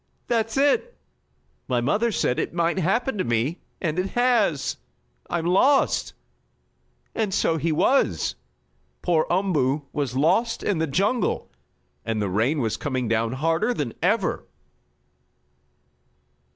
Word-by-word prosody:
"That's 225 0 -1
it! 440 - +2 0.7
My 125 -2 +1
mother 210 - +1
said 125 - 0
it - - -3
might 170 +2 +1
happen 210 +6 0
to - - +2
me, 120 +8 -1 0.2
and 165 0 -1
it 190 +1 -1
has. 220 - +2 0.5
I'm 170 -1 -1
lost!" 260 +11 +3 1.0
And 215 -3 -1
so 165 -3 +1
he 165 +1 0
was! 265 - +2 0.7
Poor 165 -3 +2
Umboo 155 -7 +1
was 140 -4 -2
lost 225 - +1
in 195 -6 0
the 160 - 0
jungle, 200 - 0 0.5
and 115 -1 -2
the 100 -2 -1
rain 120 - +1
was 110 -3 -1
coming 130 -4 -2
down 115 +1 0
harder 165 - 0
than 135 - -3
ever! 205 +7 +1
170 Hz, 125 wpm, -24 LUFS, 135-215 Hz, 1.0 s, lost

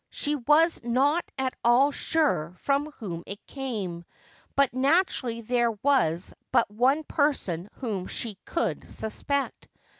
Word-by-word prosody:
She 295 - -2
was 300 +5 +3
not 275 +8 +2
at 265 -1 -1
all 250 +5 +5
sure 280 - 0
from 280 +6 0
whom 175 -9 -6
it 200 +1 -8
came, 210 -11 -4 0.5
but 275 -3 +3
naturally 260 -4 +1
there 235 0 +1
was 205 - +1 0.2
but - - +3
one 260 +8 +2
person 210 - 0
whom 205 -8 -4
she 215 -5 -4
could 335 - -2
suspect. 275 +6 -3
255 Hz, 125 wpm, -27 LUFS, 210-285 Hz, 0.5 s, all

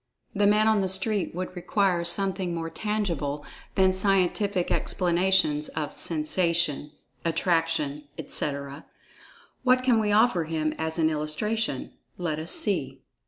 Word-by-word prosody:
The 205 0 +2
"man 210 +1 +4
on 220 -1 +3
the 190 -1 0
street" 190 0 -1
would 185 +1 -5
require 180 -1 0
something 185 0 +1
more 165 0 -4
tangible 170 -9 -3 0.3
than 190 -1 +4
scientific 195 0 +1
explanations 175 -4 +1
of 150 -1 -4
"sensation," 165 -2 0 0.3
"attraction," 165 -3 0
etc. 140 0 -3 0.7
What 255 0 +3
can 245 -3 +3
we 210 -1 0
offer 205 -5 +3
him 155 -1 -2
as 160 +1 -2
an 160 -1 +2
illustration? 155 - -2 0.3
Let 160 -4 -2
us 160 +2 -2
see! 135 -10 0
175 Hz, 125 wpm, -26 LUFS, 155-200 Hz, 0.7 s, man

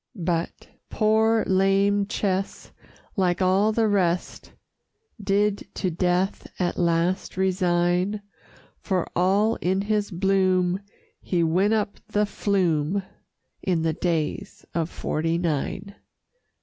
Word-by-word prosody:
But 170 -3 -3 0.2
Poor 220 +1 +2
Lame 195 +1 +2
Ches, 195 -2 -2 0.4
like 180 -3 +1
all 190 +3 +3
the 225 0 +2
rest, 180 -4 -1 0.7
Did 200 +1 +1
to 185 - -1
death 180 +3 0
at 175 -2 -1
last 170 +2 0
resign, 180 +1 +1 0.6
For 185 -4 -1
all 200 +5 +2
in 190 +2 0
his 210 0 0
bloom 185 -1 +1 0.4
he 175 -2 0
went 185 +7 +2
up 210 -1 -2
the 210 0 +1
Flume 190 -3 0 0.6
In 175 -4 0
the 160 -1 +1
Days 165 -2 -3
of 165 -1 -1
'Forty 165 0 -1
Nine. 170 +4 -2
185 Hz, 110 wpm, -24 LUFS, 175-200 Hz, 0.7 s, all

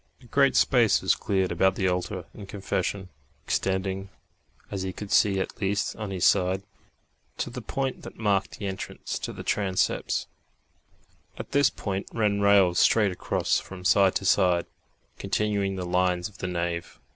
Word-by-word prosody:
A 125 - -19
great 140 +3 +3
space 120 -5 +4
was - - +4
cleared 95 -2 -1
about 95 +2 +2
the 95 - 0
altar 90 0 -2
and 100 -2 -10
confession, 95 -1 -3 0.4
extending, 95 0 -1 0.6
as 100 - -3
he 95 0 -3
could 100 +2 -8
see 100 -2 +4
at 95 - -5
least 100 +1 0
on 105 -2 -5
his 95 -3 0
side, 95 0 +3 0.7
to - - -3
the - - -6
point 135 -1 -3
that - - -10
marked 100 -3 0
the 100 - -6
entrance 95 -1 -5
to - - -4
the - - -8
transepts; 95 -3 0 1.1
at - - -8
this 140 -1 +4
point 100 -1 -4
ran 105 -3 +1
rails 100 -3 +5
straight 105 -4 +4
across 90 - 0
from 90 -1 -10
side 95 -1 +4
to 95 - -1
side, 90 -3 +3 0.5
continuing 100 -2 0
the 90 -1 -4
lines 90 0 +1
of 105 - -17
the - - -3
nave. 85 -1 -3
95 Hz, 165 wpm, -26 LUFS, 90-105 Hz, 1.1 s, rails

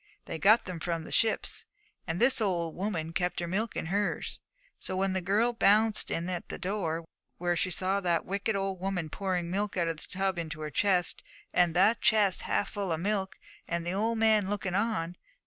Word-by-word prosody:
They 160 - -5
got 215 +6 +5
them 180 -3 -5
from 165 0 -2
the - - -10
ships, 225 -1 +1 0.4
and 170 0 -2
this 245 0 +5
old 170 -6 0
woman 175 -5 -3
kept 180 +1 0
her 175 - -2
milk 210 +6 -2
in - - -2
hers. 200 +5 -1 0.4
So 185 - -2
when 190 0 +1
the 190 - 0
girl 210 +7 +2
bounced 215 0 +3
in 170 +1 -2
at 180 -2 -4
the - - -4
door, 180 -4 -2 0.3
there 175 0 +1
she 180 - +1
saw 185 +3 0
that 175 -4 0
wicked 200 +3 -1
old 195 -1 -2
woman 180 -4 -2
pouring 180 -3 -2
milk 200 +1 -1
out 170 -2 +1
of 165 -1 -2
the - - -8
tub 190 -1 -1
into 155 -2 -5
her 150 0 -4
chest, 185 +1 +1 0.3
and 175 -2 +3
the 205 +6 +5
chest 210 -4 +4
half - - 0
full 200 -4 -3
of 160 - 0
milk, 195 +1 -1 0.3
and 170 0 -2
the 175 - -1
old 225 +4 0
man 215 -3 +3
looking 200 -3 -2
on! 185 -4 -1
190 Hz, 205 wpm, -30 LUFS, 170-205 Hz, 0.4 s, got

